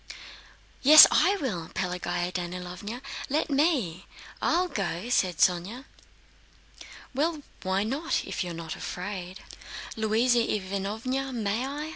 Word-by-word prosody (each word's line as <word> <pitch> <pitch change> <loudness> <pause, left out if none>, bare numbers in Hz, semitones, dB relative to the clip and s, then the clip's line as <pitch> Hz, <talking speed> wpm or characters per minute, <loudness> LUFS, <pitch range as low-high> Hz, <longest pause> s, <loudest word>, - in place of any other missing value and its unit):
"Yes, 305 +3 +11
I 400 +2 +3
will; 180 - -3
Pelagéya 180 -1 -2
Danílovna, 180 +6 -6 0.3
let 300 +2 0
me! 270 - +1 0.3
I'll 360 +2 +2
go," 195 - -3
said 185 -8 +1
Sónya. 190 - +1 1.3
"Well, 300 +2 -1 0.2
why 190 +1 0
not, 275 +9 -2
if - - -3
you're 175 -2 -6
not 165 -1 -6
afraid?" 185 0 -6 0.5
"Louisa 225 +3 +2
Ivánovna, 220 +6 -2
may 225 +3 -1
I?" 295 +3 -5
210 Hz, 110 wpm, -27 LUFS, 180-270 Hz, 1.3 s, Yes